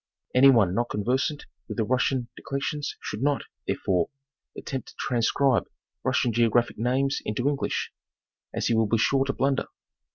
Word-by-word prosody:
Any 130 +2 +7
one 110 -9 +4
not 120 +4 0
conversant 130 +8 -1 0.2
with 110 - -6
the 110 - +2
Russian 130 +1 +1
declensions 140 +1 -3
should 105 - -4
not, 145 0 +1 0.2
therefore, 90 -3 0 0.5
attempt 135 -2 -5
to - - -13
transcribe 120 -1 +2 0.4
Russian 120 - +1
geographic 120 0 +2
names 130 +4 +1
into 115 +5 -1
English, 145 -1 -1 0.6
as - - -2
he - - +2
will 110 -1 +3
be 115 - +2
sure 135 +4 +2
to 135 - -1
blunder. 135 0 0
125 Hz, 155 wpm, -26 LUFS, 115-135 Hz, 0.6 s, Any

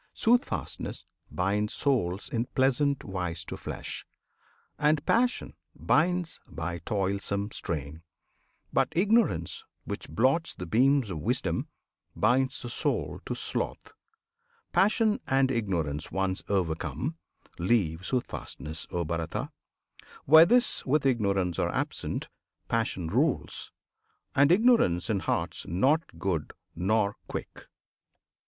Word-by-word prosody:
Soothfastness 245 +2 0 0.2
binds 100 +6 0
souls 105 -9 0
In 120 +1 -1
pleasant 135 +2 +2
wise 90 -3 -4
to - - -6
flesh; - - -6 0.8
and 150 0 +2
Passion 245 +2 +1 0.2
binds 175 +1 +1
By 85 -1 -4
toilsome 100 +2 -1
strain; 75 0 -4 0.7
but - - +3
Ignorance, 195 - +2 0.2
which - - -6
blots 130 - +1
The 90 - -6
beams 125 - +3
of 80 - -4
wisdom, - - -1 0.5
binds 130 +5 +2
the 120 - -5
soul - - 0
to - - -2
sloth. - - -3 0.8
Passion 215 +2 +3
and 135 0 +3
Ignorance, 85 - -1
once 95 -1 -1
overcome, 85 - -1 0.4
Leave 85 -4 +2
Soothfastness, 80 - -4
O 85 -1 -2
Bharata! 80 0 -3 0.7
Where 160 +3 +9
this 245 +3 +3
With 140 +1 +1
Ignorance 100 -8 +1
are - - +1
absent, - - -3 0.4
Passion 110 -6 -1
rules; 130 - 0 0.6
And 140 +3 +5
Ignorance 180 - +4
in 100 - +1
hearts - - -2
not 135 - +1
good 85 -6 -2 0.2
nor 100 +3 +1
quick. - - -7
105 Hz, 110 wpm, -28 LUFS, 85-140 Hz, 0.8 s, Where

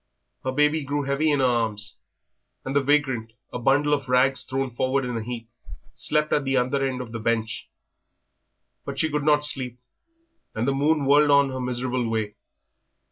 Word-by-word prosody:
Her 130 - -1
baby 150 +3 +2
grew 145 +1 -2
heavy 140 +3 +1
in 145 -2 +2
her - - +4
arms, 115 -4 -1 0.7
and 135 - -3
the 145 - +4
vagrant, 135 -6 +1 0.2
a - - -3
bundle 145 +4 +3
of 140 -3 -1
rags 130 +1 +3
thrown 135 0 -2
forward 130 +2 0
in 125 -1 -3
a 115 - -2
heap, 115 0 -6 0.5
slept 150 0 0
at 145 - +2
the 135 0 +1
other 135 +3 +1
end 130 -2 -1
of 120 -3 -8
the 115 - -5
bench. 115 0 -2 1.1
But - - -6
she 160 - +1
could 150 0 -1
not 150 0 +3
sleep, 125 -4 -2 0.8
and 115 +3 -1
the 140 - +2
moon 145 +1 +1
whirled 145 +2 +5
on 140 -1 +5
her 130 0 -4
miserable 125 -1 -2
way. 110 -2 -2
135 Hz, 185 wpm, -24 LUFS, 125-145 Hz, 1.1 s, whirled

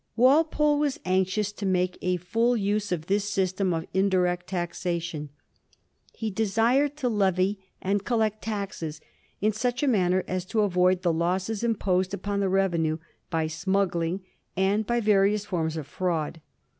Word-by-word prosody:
Walpole 295 +4 +4
was 290 -2 0
anxious 190 +3 +1
to 210 - -9
make 185 -1 0
a 180 0 +1
full 230 +7 +1
use 205 0 -1
of 165 -3 -2
this 205 +2 0
system 190 -1 0
of 165 -1 -2
indirect 180 -2 +1
taxation. 170 -3 -3 0.8
He 220 -2 -4
desired 230 +8 +2
to 260 - -1
levy 195 -2 +1 0.2
and 200 +1 0
coUect 220 -2 0
taxes 195 -8 -4 0.4
in 215 +2 +3
such 245 +5 -1
a - - +2
manner 185 -6 +2
as 185 0 -2
to 215 +3 0
avoid 185 -2 +2
the 170 -2 +2
losses 185 +6 -1
imposed 190 -5 +1
upon 200 +2 -3
the 195 -1 +1
revenue 170 -5 +1 0.3
by 160 -2 0
smuggling 175 +1 0 0.4
and 200 +3 +1
by 240 0 +1
various 205 0 +3
forms 165 -5 -2
of 155 - -4
fi*aud. 165 0 -2
190 Hz, 150 wpm, -26 LUFS, 180-215 Hz, 0.8 s, Walpole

